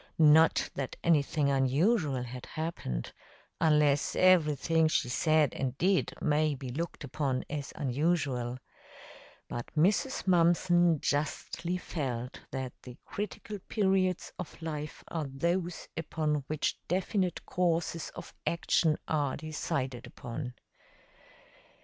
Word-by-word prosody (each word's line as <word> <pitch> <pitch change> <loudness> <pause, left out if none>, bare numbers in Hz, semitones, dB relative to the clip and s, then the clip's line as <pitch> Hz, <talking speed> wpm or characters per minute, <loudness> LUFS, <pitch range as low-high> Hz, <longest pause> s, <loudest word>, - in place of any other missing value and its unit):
Not 160 +1 +5
that 135 -2 -4
anything 150 -3 +3
unusual 140 - +2
had 125 +1 -8
happened, 155 - -4 0.5
unless 150 -3 +3
everything 165 -3 +4
she 140 -5 +1
said 155 +2 +3
and 130 -1 -3
did 190 +1 +2
may 150 0 +2
be 130 -1 -7
looked 165 +5 -4
upon 135 -2 -1
as 145 -2 -4
unusual; 135 -3 0 0.9
but 120 - -5
Mrs. 205 - +2
Mumpson 175 -2 +4
justly 165 +4 -1
felt 125 -8 -4
that 130 -2 -4
the 125 -1 -11
critical 210 0 -5
periods 190 -3 +1
of 180 - -7
life 155 -2 -5
are 160 -4 -3
those 170 +6 -2
upon 150 -3 -1
which 155 -1 -1
definite 185 0 0
courses 170 -2 0
of - - -9
action 165 -2 +2
are 145 -4 0
decided 140 -4 -3
upon. 125 +1 -6
155 Hz, 110 wpm, -30 LUFS, 135-170 Hz, 0.9 s, Not